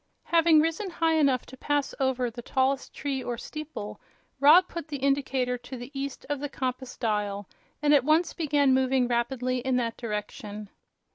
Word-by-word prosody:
Having 330 Hz, -2 st, +5 dB
risen 330 Hz, +5 st, -1 dB
high 330 Hz, -2 st, +1 dB
enough 280 Hz, -5 st, +2 dB
to 260 Hz, -, -12 dB
pass 290 Hz, +1 st, -1 dB
over 260 Hz, -2 st, 0 dB
the 240 Hz, +1 st, -8 dB
tallest 265 Hz, +2 st, 0 dB
tree 275 Hz, -3 st, -3 dB
or 240 Hz, -1 st, -3 dB
steeple, 305 Hz, -6 st, -7 dB, 0.4 s
Rob 320 Hz, +7 st, +7 dB
put 335 Hz, -3 st, -6 dB
the 295 Hz, -2 st, -4 dB
indicator 265 Hz, -2 st, 0 dB
to 250 Hz, +2 st, -8 dB
the 245 Hz, +3 st, -9 dB
east 275 Hz, 0 st, -5 dB
of 290 Hz, -1 st, -2 dB
the 290 Hz, +1 st, -4 dB
compass 255 Hz, -1 st, -4 dB
dial 205 Hz, -3 st, -1 dB, 0.4 s
and 295 Hz, 0 st, +5 dB
at 280 Hz, -4 st, +5 dB
once 315 Hz, +4 st, +2 dB
began 290 Hz, -4 st, +2 dB
moving 260 Hz, -1 st, +2 dB
rapidly 250 Hz, +1 st, 0 dB
in 260 Hz, +1 st, 0 dB
that 235 Hz, -2 st, -1 dB
direction. 210 Hz, -2 st, -5 dB
265 Hz, 170 wpm, -27 LUFS, 245-290 Hz, 0.4 s, Rob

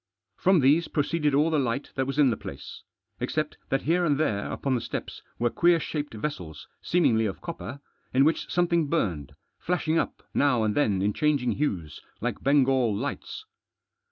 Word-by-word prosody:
From 185 Hz, -3 st, +3 dB
these 150 Hz, +6 st, +4 dB
proceeded 150 Hz, -1 st, 0 dB
all 155 Hz, +3 st, +3 dB
the 155 Hz, -, +2 dB
light 130 Hz, +1 st, -2 dB
that 135 Hz, -1 st, -1 dB
was 135 Hz, +1 st, -3 dB
in 140 Hz, -4 st, +5 dB
the -, -, 0 dB
place, -, -, -9 dB, 0.4 s
except -, -, -2 dB
that 135 Hz, -, 0 dB
here 175 Hz, +4 st, +2 dB
and 150 Hz, -5 st, +2 dB
there 105 Hz, -10 st, 0 dB
upon 135 Hz, -, -1 dB
the 120 Hz, -, 0 dB
steps -, -, -6 dB, 0.2 s
were 120 Hz, -1 st, +1 dB
queer 170 Hz, -1 st, +4 dB
shaped 145 Hz, -3 st, -4 dB
vessels, 90 Hz, -, -5 dB
seem 175 Hz, +1 st, +1 dB
ingly 110 Hz, -4 st, +3 dB
of 95 Hz, -, -7 dB
copper, 140 Hz, -5 st, -7 dB, 0.3 s
in 135 Hz, +2 st, +4 dB
which 160 Hz, -, 0 dB
something 170 Hz, -3 st, +2 dB
burned, 90 Hz, -, -2 dB, 0.2 s
flashing 165 Hz, -2 st, 0 dB
up -, -, -3 dB
now 125 Hz, -6 st, +3 dB
and 105 Hz, -1 st, +1 dB
then 100 Hz, -9 st, +1 dB
in 105 Hz, +1 st, +1 dB
changing 145 Hz, -4 st, +1 dB
hues, 90 Hz, -, -2 dB, 0.2 s
like 120 Hz, +2 st, -3 dB
Bengal 135 Hz, -5 st, +3 dB
lights. 145 Hz, -, -5 dB
140 Hz, 180 wpm, -27 LUFS, 115-155 Hz, 0.4 s, in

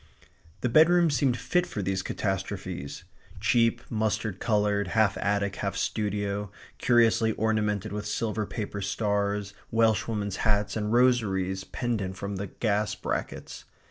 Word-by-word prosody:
The -, -, +1 dB
bedroom 165 Hz, +5 st, +5 dB
seemed 130 Hz, -2 st, +2 dB
fit 175 Hz, +9 st, +1 dB
for 105 Hz, -, -4 dB
these 95 Hz, 0 st, 0 dB
catastrophes 95 Hz, -7 st, -4 dB, 0.4 s
cheap, 115 Hz, +1 st, +3 dB
mustard 110 Hz, -2 st, -1 dB
coloured, 105 Hz, -3 st, +1 dB
half 110 Hz, -2 st, +4 dB
attic, 100 Hz, -1 st, 0 dB
half -, -, -2 dB
studio, 100 Hz, -1 st, -2 dB, 0.3 s
curiously 115 Hz, -2 st, +4 dB
ornamented 105 Hz, -3 st, 0 dB
with 105 Hz, 0 st, -4 dB
silver 110 Hz, -1 st, -1 dB
paper 100 Hz, -2 st, -4 dB
stars, 100 Hz, 0 st, -1 dB, 0.2 s
Welshwomen's 110 Hz, -2 st, +1 dB
hats, 105 Hz, -1 st, +1 dB
and 105 Hz, -1 st, -1 dB
rosaries 100 Hz, -6 st, +2 dB
pendent 105 Hz, -7 st, -3 dB
from 100 Hz, 0 st, -4 dB
the 100 Hz, +1 st, -3 dB
gas 105 Hz, -1 st, 0 dB
brackets. -, -, -4 dB
105 Hz, 125 wpm, -27 LUFS, 100-115 Hz, 0.4 s, bedroom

